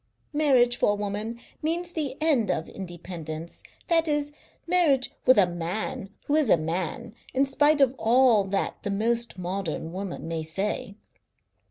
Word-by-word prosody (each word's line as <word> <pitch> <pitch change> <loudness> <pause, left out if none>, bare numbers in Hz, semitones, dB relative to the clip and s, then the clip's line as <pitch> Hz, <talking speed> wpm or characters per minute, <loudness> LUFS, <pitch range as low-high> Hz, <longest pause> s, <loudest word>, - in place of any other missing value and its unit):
Marriage 255 -5 +4
for 205 - +3
a - - -1
woman 210 +3 -4 0.2
means 340 +3 -1
the 295 -5 -3
end 280 - +2
of 165 - -1
independence, 170 -3 -7 0.3
that 330 -1 +3
is, 295 -1 0 0.3
marriage 330 -7 +3 0.2
with 255 - +7
a 200 - +7
man 180 +6 -4 0.2
who 290 - -1
is 305 -6 +3
a - - +6
man, 170 +7 -3 0.2
in 270 +1 +4
spite 290 +2 +3
of 265 -2 +5
all 235 -1 +5
that 195 0 -2
the 205 - -3
most 230 +3 0
modern 180 -3 -3
woman 190 -3 -5
may 165 -1 -2
say. 195 +5 -3
220 Hz, 155 wpm, -26 LUFS, 185-275 Hz, 0.3 s, with